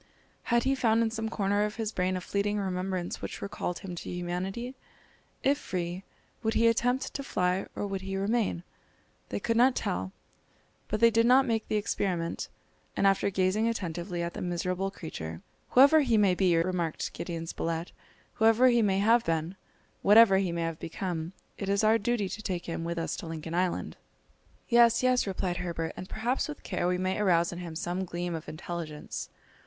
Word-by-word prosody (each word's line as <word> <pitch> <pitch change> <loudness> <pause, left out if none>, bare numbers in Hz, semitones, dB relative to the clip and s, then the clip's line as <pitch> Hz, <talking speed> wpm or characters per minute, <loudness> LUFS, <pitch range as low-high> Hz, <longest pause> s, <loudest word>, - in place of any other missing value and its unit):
Had 235 0 +2
he 265 +1 +2
found 230 -3 +3
in 225 - 0
some 225 0 -3
corner 205 -1 +1
of 210 0 -2
his 220 -2 -2
brain 185 -1 0
a - - -5
fleeting 205 +2 -1
remembrance 185 -2 -2
which - - -5
recalled 180 -3 -4
him 180 - -5
to 175 - -6
humanity? 180 +8 -3 0.7
If 285 +2 +3
free, 180 -2 -4 0.4
would 220 -1 0
he 230 - +4
attempt 245 +3 +1
to - - -3
fly, 185 -7 0
or - - -2
would 195 -1 -3
he 195 0 -4
remain? 200 -3 0 0.7
They - - -2
could 230 0 0
not 250 +2 +5
tell, 95 +1 -2 0.8
but 215 +1 -2
they 230 0 +7
did 230 +1 +3
not 260 +2 +6
make 225 -3 -1
the - - -1
experiment; 185 -5 -1 0.5
and - - +2
after 195 0 +3
gazing 190 +3 +1
attentively 175 -4 -3
at 170 - -3
the - - -6
miserable 180 +2 -1
creature, 85 - -7 0.3
"Whoever 280 +5 +7
he 240 -5 +2
may 200 -3 +4
be," 180 -2 +3
remarked 170 -1 -1
Gideon 170 -1 -5
Spilett; 165 +1 -3 0.4
"whoever 225 +3 +5
he 240 -1 +4
may 195 -3 +2
have 225 +4 +4
been, 165 0 +1
and 175 +4 -8 0.5
whatever 205 -1 +7
he 190 -3 0
may 165 -1 -1
become, 165 +1 -4 0.3
it 195 - -3
is 200 +1 +2
our 220 +1 +5
duty 220 -1 0
to 205 - -6
take 185 -5 -3
him 165 -1 -4
with 170 0 -3
us 165 - -2
to - - -7
Lincoln 160 0 -6
Island." 180 +1 -1 0.7
"Yes, 235 0 +5
yes!" 255 -3 +3
replied 185 -2 -2
Herbert; 170 -2 -3
"and 185 - -8
perhaps 240 +4 -1
with 300 -1 -8
care 180 -2 -1
we 180 0 +1
may 185 +2 -1
arouse 175 -4 +3
in 175 - -6
him 170 -3 -7
some 175 +2 -2
gleam 175 -1 -4
of 160 0 -6
intelligence." 155 -1 -6
190 Hz, 190 wpm, -29 LUFS, 175-225 Hz, 0.8 s, they